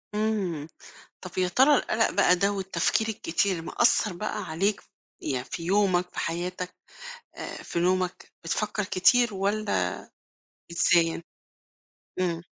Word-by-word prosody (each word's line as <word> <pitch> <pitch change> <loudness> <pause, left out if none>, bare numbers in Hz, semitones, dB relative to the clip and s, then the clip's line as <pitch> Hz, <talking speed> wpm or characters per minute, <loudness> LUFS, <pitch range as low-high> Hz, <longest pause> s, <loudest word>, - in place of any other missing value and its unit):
إمم. 195 -8 -1 0.6
طَب 185 - -8
يا 185 -1 +2
ترى 270 +8 +5
القلَق 225 -1 +1
بقى 180 -2 +4
ده 200 +3 +1
والتفكير 195 +3 0
الكتير 185 -3 -1
مأثّر 215 +1 +2
بقى 210 +5 -4
عليك 195 +6 -1 0.4
يع 130 -4 -2
في 135 +5 -7
يومك، 185 -2 +2
في - - -11
حياتك 180 +2 -3 0.6
آآ، - - -7
في 170 - -3
نومك؟ 185 0 0
بتفكّر 210 +5 -1
كتير 235 +5 +3
والّا 195 - 0 0.8
بتنساه؟ 170 -1 +3 1.0
إمم. 170 -2 -1
185 Hz, 120 wpm, -27 LUFS, 170-210 Hz, 1.0 s, ترى